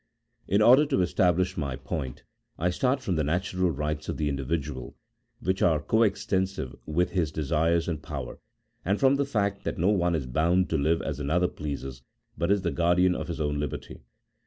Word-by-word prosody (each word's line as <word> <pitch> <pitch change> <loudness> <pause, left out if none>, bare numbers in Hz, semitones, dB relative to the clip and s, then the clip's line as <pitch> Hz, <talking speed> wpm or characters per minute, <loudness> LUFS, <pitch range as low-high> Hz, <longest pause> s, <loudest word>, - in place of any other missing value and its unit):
In 100 +3 +3
order 130 +6 +7
to 135 -11 +2
establish 90 0 +1
my 70 -5 -2
point, 65 0 -5 0.3
I 90 +2 +1
start 130 +8 +1
from 90 -7 -1
the 80 - +1
natural 90 +4 0
rights 75 0 -3
of - - -3
the 75 -1 0
individual, 70 -1 -3 0.5
which 95 +2 -1
are 80 -3 +4
co 110 +10 +1
extensive 95 - 0
with 90 +4 +1
his 85 -5 0
desires 80 +3 +1
and 80 -4 -3
power, 70 -5 -6 0.4
and 100 +3 0
from 135 0 +5
the 140 - +1
fact 100 -6 -1
that - - -3
no 90 +4 +2
one 90 -4 +2
is 75 -5 -2
bound 85 +8 +1
to 80 - +2
live 80 +4 +1
as 75 -2 -3
another 85 +5 +1
pleases, 70 -5 -6 0.3
but 85 +3 -1
is 100 -1 +2
the 85 - 0
guardian 90 +2 +3
of - - -4
his - - -5
own 75 -1 -1
liberty. 75 -2 -5
85 Hz, 190 wpm, -27 LUFS, 75-95 Hz, 0.5 s, order